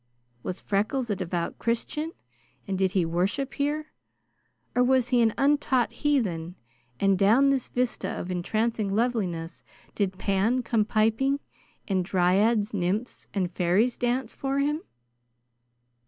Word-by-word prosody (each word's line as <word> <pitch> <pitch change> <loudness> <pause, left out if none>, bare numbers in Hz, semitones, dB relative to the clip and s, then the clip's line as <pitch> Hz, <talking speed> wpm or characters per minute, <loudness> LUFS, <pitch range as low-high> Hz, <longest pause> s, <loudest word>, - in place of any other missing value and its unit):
Was 185 +7 -4
Freckles 215 +4 0
a - - +1
devout 175 -2 -3
Christian, 300 +7 -2 0.6
and 195 - -1
did 190 0 +1
he 185 -4 +2
worship 195 +12 -1
here? 300 +2 -2 0.8
Or 250 - +3
was 255 -1 +3
he 245 -2 +4
an 225 -1 +4
untaught 275 -3 +2
heathen, 185 - -1 0.4
and 195 -2 +3
down 240 +8 +5
this 270 -3 -1
vista 250 -1 -1
of 185 - -4
entrancing 215 +3 -1
loveliness 195 -8 -1 0.3
did 190 -2 -1
Pan 205 +7 +1
come 225 -2 +1
piping, 225 +6 +2 0.5
and 190 -2 +1
dryads, 200 +4 +2
nymphs, 205 +5 -2
and 185 -3 0
fairies 190 +8 +2
dance 245 -1 -1
for 275 0 -2
him? 295 +3 +1
220 Hz, 130 wpm, -27 LUFS, 190-255 Hz, 0.8 s, down